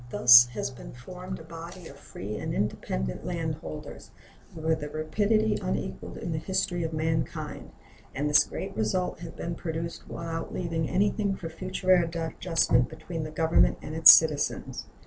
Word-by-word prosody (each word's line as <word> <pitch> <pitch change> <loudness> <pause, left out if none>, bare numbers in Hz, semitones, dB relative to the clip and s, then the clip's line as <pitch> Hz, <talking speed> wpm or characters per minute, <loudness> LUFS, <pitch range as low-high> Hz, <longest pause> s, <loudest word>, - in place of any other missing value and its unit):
Thus 125 0 +8
has 130 - -3
been 125 - -11
formed 180 +9 -8
a - - -11
body 170 +2 -10
of 140 - -12
free 105 -6 -8
and - - -4
independent - - -3
landholders - - -6 0.5
with 160 -1 -1
a 150 - -5
rapidity 205 +8 0
unequaled 65 0 -4
in 170 - -5
the 155 - -2
history 175 +1 -1
of 165 -1 -2
mankind; 155 - -3 0.5
and 145 +2 -1
this 150 0 +5
great - - -6
result 110 +12 -1
has 170 -1 -7
been 170 - -5
produced 165 0 -5
without 165 -1 -5
leaving 165 -3 -2
anything 200 +1 +1
for 165 -3 -7
future 185 +2 -2
adjustment 165 -6 +1
between 160 +1 -6
the 155 - -5
Government 160 +1 +2
and 155 - -7
its 160 0 +11
citizens. 155 -2 +2
160 Hz, 155 wpm, -27 LUFS, 150-175 Hz, 0.5 s, its